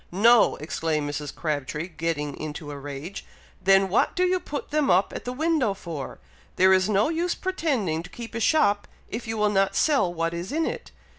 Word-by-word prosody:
"No!" 225 +5 +5
exclaimed 155 0 -2
Mrs. 145 0 -5
Crabtree, 150 +1 -3
getting 160 -4 -3
into 150 0 -6
a 145 - -6
rage; 145 +7 -7 0.4
"then 195 0 +5
what 195 +5 +1
do 365 - +2
you 365 0 +2
put 290 -5 -6
them 300 -2 +1
up 185 +3 +3
at - - -6
the 245 - -2
window 285 -6 +1
for? 165 -8 -7 0.4
There 190 +1 +5
is 185 +2 +3
no 210 +5 +3
use 335 +2 0
pretending 265 - -1
to 175 - -11
keep 235 +3 -9
a 230 - -3
shop, 210 -6 +2 0.2
if 230 +1 -5
you 225 0 -3
will 210 -1 +2
not 195 -1 +2
sell 275 - +3
what 165 0 -2
is 170 +5 -5
in 320 +2 0
it! - - -5
195 Hz, 200 wpm, -25 LUFS, 160-245 Hz, 0.4 s, No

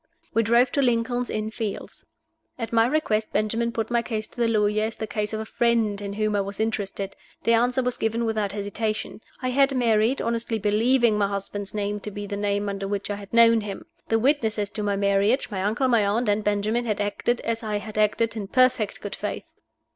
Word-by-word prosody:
We 225 - +4
drove 235 +3 +3
to 280 - +1
Lincoln's 245 0 +1
Inn 215 0 -2
Fields. 215 -2 -6 0.5
At 230 -2 -5
my 225 0 +5
request 225 -7 0
Benjamin 230 +2 0
put 225 0 -3
my 235 -1 +3
case 220 -2 -3
to - - -20
the 235 - +4
lawyer 215 -1 +2
as 225 - -4
the 220 - -4
case 210 -1 -3
of 215 - -3
a 220 - -4
friend 225 -3 +1
in 200 -1 -4
whom 215 0 0
I 200 - +2
was 200 +1 -6
interested. 205 -3 -2 0.3
The 230 - +3
answer 245 +3 +2
was 250 0 -1
given 225 +1 0
without 215 -3 -1
hesitation. 215 +2 -3 0.2
I 255 - +1
had 275 +1 +3
married, 230 +1 +2
honestly 230 -1 -1
believing 220 +2 +3
my 200 - +3
husband's 200 +1 -5
name 205 0 -2
to 210 - -6
be 205 0 -6
the 200 0 -4
name 205 0 -1
under 195 0 -3
which 205 0 -3
I - - -1
had 200 -1 -10
known 230 -1 +6
him. 205 -2 -6 0.2
The 225 - +2
witnesses 220 -5 +1
to 210 - -4
my 205 -1 0
marriage 200 +5 +2
my 190 -2 -2
uncle, 220 +7 +1
my 235 -4 +4
aunt, 215 +4 +1
and 205 +1 +1
Benjamin 210 +4 0
had 210 -3 -1
acted, 210 +4 0
as 230 0 -2
I 215 -2 -2
had 215 +1 -7
acted, 215 +2 +2
in 205 -3 -4
perfect 245 -2 +2
good 205 - -5
faith. - - -4
215 Hz, 215 wpm, -25 LUFS, 205-235 Hz, 0.5 s, known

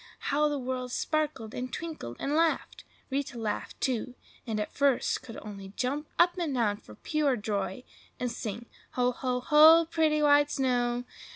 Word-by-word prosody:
How 300 +1 +3
the 290 - -1
world 255 -1 -3
sparkled 300 -8 -1
and 255 +1 -4
twinkled 315 - -6
and 280 - -2
laughed! 325 +1 0 0.3
Rita 270 -2 -2
laughed, 220 -2 -4
too, 250 -1 -1 0.3
and 220 -2 -1
at 210 - -4
first 280 -3 +2
could 230 - -10
only 195 -2 -9
jump 285 +4 -1
up 350 +1 +4
and 315 -6 -1
down 210 -4 +1
for 105 - -14
pure 295 - 0
joy, 205 +1 -3 0.4
and 245 -1 -1
sing,— 230 0 -5 0.3
"Ho! 250 0 +2
ho! 250 0 -2
ho! 315 +4 +7
Pretty 310 -2 +2
white 290 0 +5
snow!" 245 -3 0
255 Hz, 165 wpm, -29 LUFS, 235-300 Hz, 0.4 s, ho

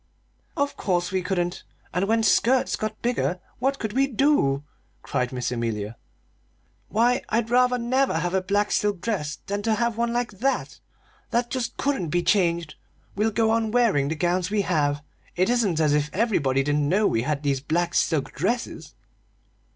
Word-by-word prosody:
"Of 285 0 -1
course 175 -2 0
we 190 -1 0
couldn't! 175 -1 -2 0.3
And 180 +3 0
when 225 +1 +2
skirts 245 +5 +3
got 215 0 -5
bigger, 235 -7 0 0.2
what 270 +3 +1
could 220 -4 -4
we 275 +1 +3
do?" 240 - +2 0.4
cried 125 -1 -1
Miss 125 -1 -2
Amelia. 115 -3 -3 0.9
"Why, 240 +3 +2
I'd 230 +1 0
rather 250 0 +4
never 255 -3 +1
have 175 +2 -1
a 190 - +2
black 205 +2 0
silk 205 -3 +1
dress 170 -8 -2
than 205 +1 -2
to 220 +1 +1
have 235 -1 -1
one 235 0 0
like 240 -1 -1
that 270 +2 -1 0.5
that 240 +1 0
just 250 -2 -3
couldn't 270 - -1
be 175 +3 0
changed! 170 -5 +1 0.4
We'll 210 +3 +2
go 220 +1 +1
on 225 -1 +1
wearing 215 - +2
the 160 - -2
gowns 175 +2 0
we 210 0 +1
have. 145 -5 0 0.3
It 185 +6 +2
isn't 210 -10 +1
as 150 -2 +3
if 150 0 +1
everybody 150 - +1
didn't 145 0 +1
know 205 +5 +3
we 115 - +2
had 145 +3 -2
these 140 -2 +1
black 170 +5 -1
silk 155 -5 +1
dresses!" 230 - -3
200 Hz, 175 wpm, -25 LUFS, 155-235 Hz, 0.9 s, rather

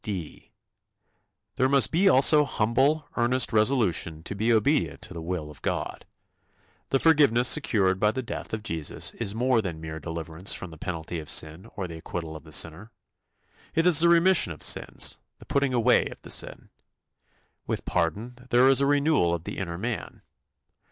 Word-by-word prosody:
" - - -46
(d) 95 -7 -7 1.1
There 130 - +2
must 135 -6 +5
be 190 +4 +3
also 150 +1 +6
humble, 140 +5 0
earnest 125 +1 +2
resolution 105 - +1
to 100 - -5
be 110 +4 -1
obedient 130 +7 0
to - - -9
the 85 - -7
will 80 -3 -5
of 75 - -15
God. - - -4 0.8
The 135 - +2
forgiveness 140 -6 +3
secured 95 -6 +2
by 105 - +2
the 130 +4 -4
death 120 - -7
of 110 -1 -5
Jesus 80 -9 -2
is 100 - -5
more 125 0 +1
than 85 -6 -6
mere 80 0 -7
deliverance 80 +3 -1
from 95 - -8
the 80 - -12
penalty 85 -1 -5
of 75 - -9
sin 80 +8 -1
or 95 -2 -5
the 80 -1 -9
acquittal 80 -1 -7
of 80 - -11
the 80 - -14
sinner. 80 +8 +1 0.8
It 165 - +1
is 175 -4 +5
the 170 +1 +6
remission 170 - +3
of 75 - -9
sins, - - +1 0.2
the - - -16
putting 140 -1 0
away 125 0 +2
of - - -11
the - - -2
sin. - - -2 1.0
With - - -4
pardon 120 +10 -3
there 125 +2 +4
is 135 0 +4
a 140 - +2
renewal 145 - +1
of 85 - -8
the - - -7
inner 85 -3 -5
man. 115 +3 -6
110 Hz, 180 wpm, -25 LUFS, 85-130 Hz, 1.1 s, also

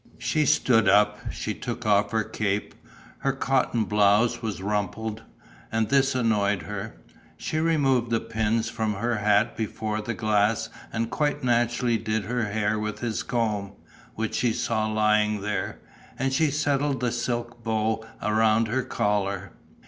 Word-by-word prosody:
She 155 -2 0
stood 115 -6 +4
up. 105 +1 +4
She 105 - -3
took 120 0 -5
off 100 -1 +3
her 110 0 0
cape. 105 -1 -2 0.5
Her 135 - 0
cotton 130 -4 +1
blouse 105 +3 +3
was 110 -5 -3
rumpled; 105 +2 -2 0.5
and 110 -1 0
this 135 -1 +3
annoyed 105 -6 +1
her. 105 +4 -6 0.4
She 155 - -2
removed 135 -7 +2
the 115 -1 +2
pins 110 0 -1
from 110 -2 -2
her 115 +3 -1
hat 105 +2 +2
before 110 -1 -3
the 115 +2 -4
glass 105 0 +1 0.2
and 115 0 -2
quite 145 -3 0
naturally 120 -1 +2
did 110 0 -2
her 120 +3 -1
hair 105 +1 0
with 105 0 -4
his 115 -2 -1
comb, 105 -4 -1 0.4
which 110 0 -2
she 120 -2 +1
saw 110 -1 0
lying 105 -1 +2
there. 105 +1 -2 0.4
And 135 +1 0
she 155 +2 +3
settled 145 -1 0
the 125 -1 0
silk 120 0 -3
bow 110 0 0 0.2
around 110 +1 +3
her 130 +3 +1
collar. 100 -6 -1
110 Hz, 150 wpm, -26 LUFS, 105-120 Hz, 0.5 s, stood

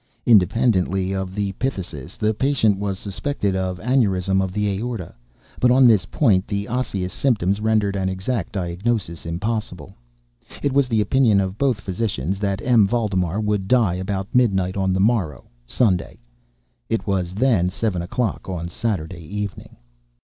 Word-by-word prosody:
Independently 95 -3 +3
of 95 -1 -4
the 100 -1 -1
phthisis, 95 - -4
the 110 +1 +1
patient 110 -5 +1
was 100 -2 -2
suspected 100 +1 -2
of 95 -1 -2
aneurism 95 -5 +1
of 95 - -3
the 105 +2 -1
aorta; 100 -1 -3 0.5
but 125 - +4
on 130 +1 +6
this 110 -5 +5
point 100 -9 +2
the 100 -1 -3
osseous 100 -7 -2
symptoms 105 -6 +1
rendered 110 -2 +1
an 95 -1 0
exact 95 +2 -3
diagnosis 90 -1 -2
impossible. 90 -2 -4 0.7
It 140 - +1
was 140 -1 +3
the 110 -3 +1
opinion 110 -1 +3
of 95 +1 -2
both 130 -7 +1
physicians 95 - -2
that 100 0 -2
M. 115 -5 +4
Valdemar 100 -5 0
would 105 -2 -1
die 115 -6 +3
about 95 +1 -4
midnight 95 -7 +2
on 95 -1 0
the 95 - 0
morrow 95 - 0 0.2
(Sunday). 95 - 0 0.7
It 115 - -1
was 95 -3 -1
then 110 -6 +2
seven 95 -2 -2
o'clock 100 +4 -2
on 85 -2 -4
Saturday 95 -5 -3
evening. 100 +4 -6
100 Hz, 150 wpm, -22 LUFS, 95-115 Hz, 0.7 s, on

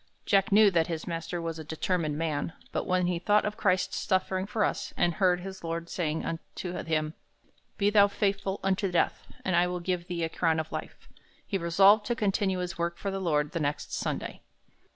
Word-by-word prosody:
Jack 195 +1 +3
knew 205 0 +7
that 165 -2 +2
his 165 -2 -4
master 170 +1 -4
was 165 -1 -4
a - - -5
determined 155 0 -1
man, 160 0 -2 0.2
but - - -2
when 180 0 +2
he 175 -1 0
thought 205 +4 +3
of 210 0 -2
Christ's 185 -3 +1
sufferings 190 +1 0
for 215 -2 +1
us, - - -3
and 175 - +2
heard 180 +1 +2
his 190 0 -8
Lord 165 0 -4
saying 160 -3 -1
unto 165 +2 -5
him, 155 -3 -1 0.6
"Be 205 0 +2
thou 205 -1 +6
faithful 200 -1 -1
unto 195 0 +1
death, 175 - 0 0.2
and 185 - +1
I 175 +1 +4
will 180 0 -3
give 175 0 -2
thee 175 -2 -2
a - - +1
crown 160 -1 +1
of 160 - -4
life," - - -7 0.4
he 195 - -2
resolved 195 +5 +5
to 240 - 0
continue 195 -3 +1
his 180 0 -4
work 170 0 -1
for 200 - -3
the 195 0 -3
Lord 150 -4 +1
the 170 - -2
next 145 -1 -2
Sunday. - - -3
180 Hz, 205 wpm, -29 LUFS, 165-195 Hz, 0.6 s, knew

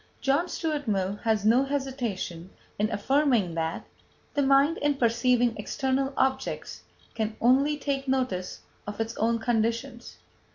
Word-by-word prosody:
John 285 +6 +1
Stuart 305 -4 -3
Mill 195 -1 0
has 220 -2 0
no 235 +5 +5
hesitation 245 -11 -3 0.3
in 210 +1 +2
affirming 250 - +2
that: 165 0 -3 0.5
"The 290 - +1
mind, 275 +4 +4
in 290 -1 +1
perceiving 240 -1 +2
external 270 +4 -1
objects, 265 0 -1 0.3
can 220 -1 -2
only 275 +5 +3
take 275 -1 -2
notice 255 -9 -1 0.3
of 205 +1 -6
its 225 +1 -2
own 230 +1 +2
conditions." 230 +2 -2
245 Hz, 130 wpm, -27 LUFS, 220-275 Hz, 0.5 s, no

